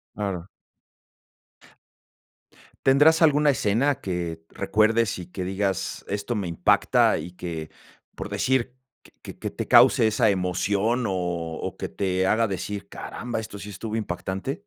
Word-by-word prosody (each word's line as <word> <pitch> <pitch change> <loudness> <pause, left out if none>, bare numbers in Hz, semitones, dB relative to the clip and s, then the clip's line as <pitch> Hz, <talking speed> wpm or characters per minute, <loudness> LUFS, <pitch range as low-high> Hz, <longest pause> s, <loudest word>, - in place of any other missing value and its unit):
Claro. 95 -4 -3 2.4
¿Tendrás 145 +5 +5
alguna 150 -2 +5
escena 125 +3 +1
que 85 -3 -4
recuerdes, 110 +1 +1
y 90 - -8
que 95 - -4
digas: 95 0 -2
"Esto 100 +4 -3
me 100 -4 -2
impacta", 85 -1 +3
y 90 - -6
que, 85 -3 -6 0.5
por - - -6
decir, 130 -1 0 0.3
que - - -19
que - - -10
que - - -3
te - - -5
cause 110 - +6
esa 110 +1 +3
emoción, 100 +5 0
o 95 - -1 0.5
o, - - -5
que - - -4
te 95 -1 0
haga 115 +3 +3
decir: 100 +1 -5
"Caramba, 115 +1 -5
esto 110 -2 -8
sí 105 - -8
estuvo 105 +3 -5
impactante". 105 - -4
105 Hz, 140 wpm, -25 LUFS, 95-115 Hz, 2.4 s, cause